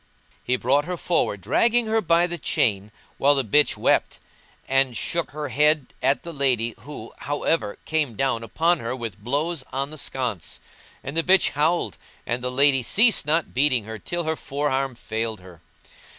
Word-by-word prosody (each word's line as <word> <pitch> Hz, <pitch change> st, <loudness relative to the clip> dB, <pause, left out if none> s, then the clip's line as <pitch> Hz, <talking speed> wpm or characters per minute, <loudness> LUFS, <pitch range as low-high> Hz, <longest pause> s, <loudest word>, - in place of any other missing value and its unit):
He 125 Hz, -, +1 dB
brought 135 Hz, +4 st, +1 dB
her 180 Hz, 0 st, -3 dB
forward, 165 Hz, -, 0 dB
dragging 235 Hz, -, +2 dB
her 220 Hz, 0 st, +1 dB
by 170 Hz, -2 st, +3 dB
the 175 Hz, -1 st, -5 dB
chain, 105 Hz, -2 st, 0 dB, 0.3 s
while 145 Hz, +1 st, +5 dB
the 135 Hz, -, +1 dB
bitch 145 Hz, +7 st, +2 dB
wept, -, -, +1 dB, 0.5 s
and 135 Hz, -2 st, +2 dB
shook 170 Hz, -1 st, -2 dB
her 150 Hz, -1 st, -5 dB
head 150 Hz, +2 st, +2 dB
at 135 Hz, +2 st, +1 dB
the 170 Hz, -, -7 dB
lady 125 Hz, -5 st, +1 dB
who, 150 Hz, 0 st, -9 dB
however, 145 Hz, -6 st, -1 dB
came 150 Hz, -7 st, -1 dB
down 130 Hz, -1 st, 0 dB
upon 165 Hz, +10 st, +1 dB
her 115 Hz, +2 st, -3 dB
with 115 Hz, -5 st, -6 dB
blows 145 Hz, +5 st, -1 dB
on 140 Hz, +2 st, -2 dB
the 155 Hz, -, -7 dB
sconce; 120 Hz, -13 st, -3 dB, 0.4 s
and 140 Hz, -, -6 dB
the 165 Hz, -, +3 dB
bitch 185 Hz, +2 st, +4 dB
howled 160 Hz, +4 st, 0 dB, 0.3 s
and 120 Hz, +1 st, -3 dB
the 125 Hz, -, -1 dB
lady 135 Hz, +1 st, +4 dB
ceased 215 Hz, -, +3 dB
not 160 Hz, +1 st, 0 dB
beating 130 Hz, -3 st, +2 dB
her 110 Hz, +1 st, -8 dB
till 175 Hz, -, -3 dB
her 160 Hz, 0 st, -1 dB
forearm 135 Hz, -3 st, -2 dB
failed 110 Hz, -2 st, -4 dB
her. 90 Hz, -3 st, -15 dB
140 Hz, 175 wpm, -24 LUFS, 120-160 Hz, 0.5 s, while